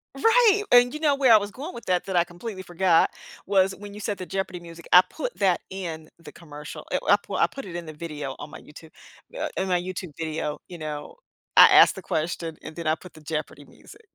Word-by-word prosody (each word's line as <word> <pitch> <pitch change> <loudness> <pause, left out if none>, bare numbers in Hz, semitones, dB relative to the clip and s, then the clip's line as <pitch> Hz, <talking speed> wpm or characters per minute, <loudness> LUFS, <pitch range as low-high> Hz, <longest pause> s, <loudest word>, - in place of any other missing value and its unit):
Right, 450 -3 +4
and, 245 +1 +6
you 305 - -5
know, 295 -3 +2
where 265 -4 +5
I - - +9
was 205 0 -3
going 295 - -8
with 235 - -9
that, 180 -1 0
that 190 - -4
I 175 - +5
completely 185 +3 -8
forgot 175 -1 +2 0.3
was 190 -1 +2
when 205 0 -10
you 210 - -9
said 205 -1 -3
the 185 - -6
Jeopardy 185 0 -4
music, 170 -1 -12
I 180 - +10
put - - -6
that 185 -3 +2
in 165 -5 -6
the 170 - -13
commercial. 150 -3 -10
I - - +2
I - - +7
p - - -11
I - - +4
put 275 - -9
it 180 -3 -8
in 175 -1 -5
the 155 - -8
video 150 -4 -6
on 150 - -8
my - - -10
YouTube, 155 +2 -14 0.5
uh, - - -2
in 190 - -1
my 180 -1 +1
YouTube 185 -3 -6
video, 155 -2 -3
you 175 - -8
know? 150 -2 -6 0.4
I - - +10
asked - - +7
the - - -8
question, 165 0 -3
and - - -9
then 170 -1 -7
I 155 - +3
put 180 +2 -14
the 155 - -15
Jeopardy 155 0 -5
music 425 - -17
180 Hz, 240 wpm, -25 LUFS, 160-205 Hz, 0.5 s, I